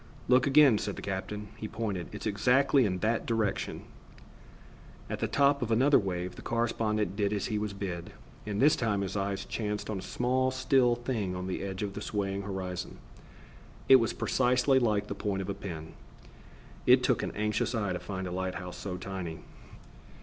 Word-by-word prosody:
"Look 125 +1 +5
again," 140 -6 +6
said 100 - -3
the - - -7
captain. 105 +2 -4
He 110 - -5
pointed. 105 -6 -3
"It's - - -7
exactly 125 +4 +3
in 90 -2 -1
that 115 +1 0
direction." 110 -4 -1 1.3
At - - -3
the - - 0
top 140 0 +3
of 120 - -1
another 130 +6 +5
wave, 90 -3 -3
the - - -8
correspondent 110 -3 0
did 100 -1 0
as 105 -2 -1
he 105 - +1
was 105 -1 -3
bid, 90 -3 -5 0.4
and 105 -1 -2
this 145 +3 +6
time 105 -4 0
his 100 0 -3
eyes 100 -1 -2
chanced 105 -1 -3
on 100 - -3
a - - -6
small 125 +6 0
still 130 -1 +3
thing 115 -6 -2
on 90 0 -4
the 95 - -3
edge 95 +1 -4
of 100 -1 -3
the 105 - -6
swaying 100 -2 -2
horizon. 95 -2 -5 0.9
It 135 - +9
was 115 -3 +1
precisely 125 +1 +2
like 105 -4 +1
the - - -4
point 95 -2 -2
of 95 - -7
a - - 0
pin. 85 -5 -7 0.9
It - - +7
took - - +2
an - - -2
anxious 105 +3 0
eye 100 -4 0
to 90 - -3
find 95 -2 -5
a 90 - -4
light 95 0 -2
house 90 0 -6
so 90 -3 -5
tiny. 90 -5 -5
105 Hz, 190 wpm, -30 LUFS, 95-120 Hz, 1.3 s, It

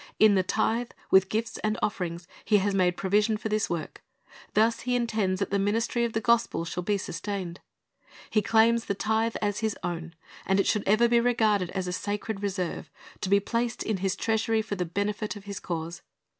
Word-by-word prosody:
In 215 -1 +6
the 190 - +4
tithe, 225 +5 0 0.2
with 190 0 +6
gifts 225 +1 -2
and 215 +1 -1
offerings, 175 -4 -2 0.2
He 210 - +4
has 200 0 +1
made 180 -2 +2
provision 210 +3 +2
for 220 - -4
this 215 +1 0
work. 170 -2 -4 0.5
Thus 225 +2 +3
He 250 0 -1
intends 215 -6 0
that 200 - -2
the 200 - +2
ministry 230 +4 +1
of 230 - -3
the 225 - +1
gospel 235 -6 +2
shall 180 - -3
be 205 +3 0
sustained. 185 0 -5 0.7
He 215 - +3
claims 230 +1 +3
the 200 - -1
tithe 220 +2 0
as 205 -1 0
His 220 -1 -1
own, 170 -1 -4 0.3
and 195 +1 +2
it 195 - +3
should 210 - 0
ever 215 +4 +5
be 235 0 +4
regarded 220 -6 +2
as 190 -1 -1
a 180 - -3
sacred 205 +2 -3
reserve, 190 -3 -3 0.3
to 185 - -3
be 200 +1 +5
placed 235 +3 -2
in 215 -2 -1
His 190 0 -1
treasury 225 0 +1
for 215 - -5
the 180 -3 -1
benefit 205 +5 -2
of 205 - -10
His 200 -1 -6
cause. 170 -2 -5
205 Hz, 200 wpm, -27 LUFS, 190-225 Hz, 0.7 s, In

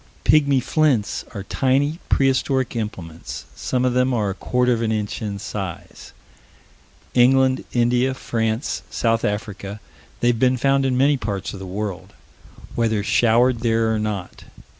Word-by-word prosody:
"Pigmy 140 -3 +4
flints" 130 -5 +1
are 100 - -4
tiny, 140 - +1
prehistoric 135 -1 +1
implements. 90 -8 -6
Some 125 -1 -1
of 125 - +1
them 125 0 +2
are 105 -4 0
a - - -3
quarter 125 +5 +1
of 115 - -2
an 110 -1 0
inch 105 0 -2
in 105 -2 -3
size. 95 -3 -7 1.0
England, 130 +1 +4
India, 125 +2 +2
France, 115 -1 -2
South 115 -1 0
Africa 105 -1 -3 0.4
they've 120 -1 +2
been 130 +1 +3
found 135 +1 +2
in 125 -1 0
many 140 +2 +4
parts 100 -5 -4
of 100 - -7
the 95 - -7
world 100 -1 -5 0.6
whether 110 -3 0
showered 120 +4 +3
there 115 -1 +1
or 110 - 0
not. 105 -4 -4
115 Hz, 145 wpm, -22 LUFS, 105-130 Hz, 1.0 s, Pigmy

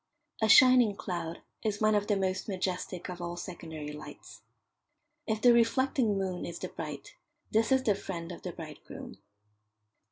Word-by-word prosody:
A 220 - +3
shining 250 -3 +7
cloud 170 -3 -5 0.2
is 210 -2 -1
one 215 0 +3
of 205 0 +1
the 210 - +2
most 190 +1 -1
majestic 185 -2 -3
of 180 -1 -6
all 175 0 -4
secondary 160 -4 -7
lights. 150 - -11 0.9
If 220 -2 -1
the 245 -1 +8
reflecting 235 -1 +2
moon 190 -2 -2
is 170 - -5
the 185 - -5
bride, 150 -3 -7 0.4
this 225 +4 +2
is 265 0 +4
the 210 - +3
friend 170 -3 -6
of 175 - -8
the 180 - -5
bridegroom. 155 -3 -10
190 Hz, 160 wpm, -30 LUFS, 175-220 Hz, 0.9 s, the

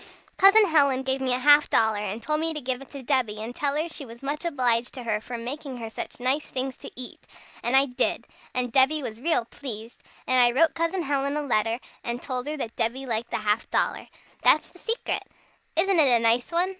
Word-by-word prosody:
"Cousin 400 +3 +7
Helen 280 -6 +3
gave 265 0 -1
me 260 -1 0
a 250 - +2
half 290 +3 +5
dollar, 220 -2 +2
and 210 +2 -4
told 305 0 0
me 325 0 -1
to - - -2
give 255 -1 -3
it 275 - -12
to 275 -2 -9
Debby, 245 -6 0
and 225 +3 -6
tell 285 +2 -1
her 310 +3 0
she 320 -3 -5
was 235 0 -12
much 290 +3 -3
obliged 250 -7 0
to 255 - -7
her 215 -2 -1
for 240 +2 -6
making 260 +3 -6
her 225 -2 -7
such - - -7
nice 265 +4 0
things 260 0 -3
to - - -10
eat. 250 0 -8 0.4
And 240 +2 0
I 270 +1 +6
did. 250 -3 -1 0.3
And 250 -1 -1
Debby 275 +4 +3
was 225 -1 -6
real 320 -6 +1
pleased. 230 -3 -7 0.2
And 255 -1 +4
I 240 +2 +3
wrote 330 -1 +5
Cousin 335 +2 -1
Helen 280 0 0
a 300 - -2
letter, 230 -3 0 0.2
and 235 0 -3
told 255 +1 -4
her 305 +1 -3
that 230 -5 -5
Debby 250 +4 -1
liked 230 -2 -3
the - - -1
half 215 +1 -1
dollar. - - 0 0.3
That's 310 - +4
the 360 - -19
secret! 455 +5 -1 0.5
Isn't 365 +2 +3
it 295 - +7
a - - -1
nice 230 +4 +2
one? 350 +2 +1
260 Hz, 230 wpm, -25 LUFS, 235-300 Hz, 0.5 s, Cousin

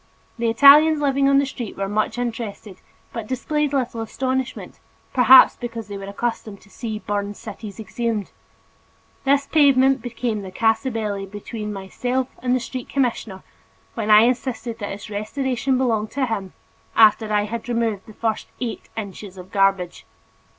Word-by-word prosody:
The 230 -1 +1
Italians 290 +6 +7
living 275 -1 +2
on 275 - +5
the 280 - +3
street 250 -5 -7
were 195 0 -2
much 215 +3 -1
interested 225 -5 -5 0.4
but 230 -3 -5
displayed 295 +4 -1
little 250 -4 -1
astonishment, 260 +3 -3 0.3
perhaps 255 +1 +8
because 230 -3 -7
they 200 - -5
were 195 - -7
accustomed 205 0 -4
to 200 - -21
see 220 -1 -5
buried 205 -1 -3
cities 215 -1 -9
exhumed. 220 -1 -3 0.9
This 280 +1 +3
pavement 270 -4 +4
became 230 -2 -3
the 190 - -7
casus 225 +6 +1
belli 205 -3 -3
between 210 +2 -6
myself 245 +6 -3
and 250 0 +1
the - - +1
street 250 +1 -6
commissioner 235 -7 -2 0.5
when 220 -2 -3
I 210 0 +8
insisted 240 -1 -1
that 205 - -4
its 200 +2 -8
restoration 255 +4 -1
belonged 225 -4 0
to 275 -1 0
him, 200 -6 -4 0.4
after 220 0 +5
I 210 -1 +2
had 230 +3 -5
removed 230 -3 -1
the 215 - -12
first 225 -2 -2
eight 240 -3 -5
inches 200 -2 -7
of 185 +1 -11
garbage. 195 -3 +1
230 Hz, 155 wpm, -22 LUFS, 210-255 Hz, 0.9 s, perhaps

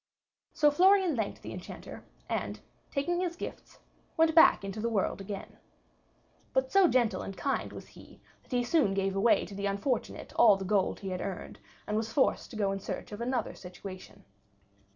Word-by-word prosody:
So 295 -1 +4
Florian 370 0 +4
thanked 220 -4 -3
the - - -6
Enchanter, - - -9 0.2
and - - -3 0.3
taking 345 +5 -1
his 355 -2 -1
gifts, - - -8 0.4
went 320 0 +4
back 320 -10 +7
into 195 +2 -5
the 230 +2 0
world 200 -2 0
again. 195 0 -7 0.9
But 265 0 +1
so 390 -2 +6
gentle 235 - +2
and 195 - -7
kind 275 -2 -1
was - - -10
he - - -16 0.2
that - - -26
he 245 -1 +1
soon 245 -7 +2
gave 195 0 0
away 215 +4 +3
to - - -10
the 200 +1 -2
unfortunate 200 +5 -2
all 215 -4 +7
the 190 - -5
gold 195 -1 +1
he 195 - -4
had 185 -1 -3
earned, 175 - -6 0.3
and 210 - -1
was 220 0 -2
forced 265 - +1
to - - -10
go 200 -2 +1
in 195 - -3
search - - -6
of 205 +2 -7
another 250 +1 -1
situation. 185 +1 -10
220 Hz, 185 wpm, -30 LUFS, 195-280 Hz, 0.9 s, back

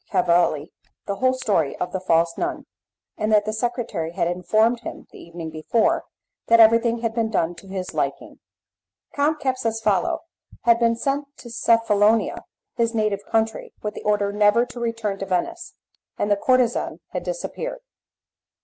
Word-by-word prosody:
Cavalli 170 -3 +2 0.3
the 200 - -3
whole 255 +2 +3
story 200 - 0
of 180 - -3
the 190 - -2
false 165 -2 +2
nun, - - -3 0.5
and 215 +1 0
that 210 -1 +4
the 215 - -2
secretary 220 -8 -2
had 170 - 0
informed 215 +7 +2
him, 235 - -8
the - - -13
evening 165 -1 -8
before, 160 +9 +1 0.4
that 230 0 +6
everything 230 +1 +5
had 230 -1 -1
been 225 -1 0
done 175 -5 0
to 175 +3 -14
his 190 -1 -5
liking. - - -3 0.7
Count 295 +2 +1
Capsucefalo 225 -8 0 0.5
had 235 -1 +5
been 230 -1 +3
sent 275 +4 -1
to 240 - -11
Cephalonia, 225 -2 +2 0.3
his 230 -1 0
native 210 -2 0
country, 225 0 -1
with 210 0 -3
the - - -8
order 205 -1 +1
never 210 +3 +4
to 245 - -10
return 230 -4 -2
to 195 - -3
Venice, 335 - -2 0.4
and 205 - 0
the - - +6
courtezan 250 +2 +1
had - - -4
disappeared. - - -5
220 Hz, 160 wpm, -23 LUFS, 195-235 Hz, 0.7 s, that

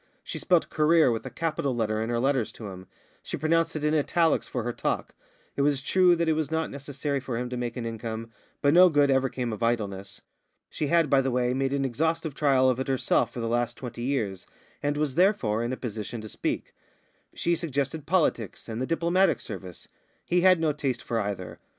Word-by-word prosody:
She - - -5
spelt 175 -3 +2
career 155 -3 +4
with 115 +2 -3
a - - -5
capital 140 -1 -2
letter 110 -2 0
in 110 - -2
her 120 -1 0
letters 130 -2 +1
to 110 -3 -8
him; 95 -1 -10 0.3
she - - -5
pronounced 165 +2 +1
it 155 - -3
in 150 0 +2
italics 160 +1 +2
in 125 - -2
her 120 +1 -2
talk. - - -2 0.4
It - - 0
was 140 -1 +1
true 180 +3 +4
that 170 0 0
it 160 - +4
was 155 -1 -1
not 160 0 -1
necessary 140 0 -3
for 130 -3 -4
him 125 +1 -3
to - - -2
make 120 0 -3
an 120 - -3
income, 115 0 -5 0.3
but 145 0 +4
no 180 +1 +8
good 145 -3 +3
ever 135 0 +2
came 120 -3 -3
of 110 - -7
idleness. 100 -4 -2 0.5
She 150 - -2
had, 165 0 +3
by 135 -1 +4
the 135 - -1
way, 125 0 +1
made 135 +1 0
an 140 -1 0
exhaustive 160 +4 -1
trial 135 -2 +3
of 130 -1 +2
it 130 - -2
herself 130 -3 +1
for 120 - -6
the 115 - -2
last 120 +1 -1
twenty 120 -2 -7
years, 110 -8 -2 0.3
and 145 0 -1
was, 150 -3 0
therefore, 160 - +2
in 120 - -2
a 130 - -3
position 110 -1 -5
to 110 - -8
speak. - - -3 0.6
She 170 - +1
suggested 150 -1 -3
politics 155 - 0
and 115 +1 -4
the 130 - -1
Diplomatic 170 +2 +2
Service; 95 -5 -8 0.4
he 175 0 +2
had 185 -1 +6
no 160 -2 +1
taste 135 -4 -2
for 115 - -1
either. 100 -3 -4
135 Hz, 220 wpm, -27 LUFS, 115-155 Hz, 0.6 s, no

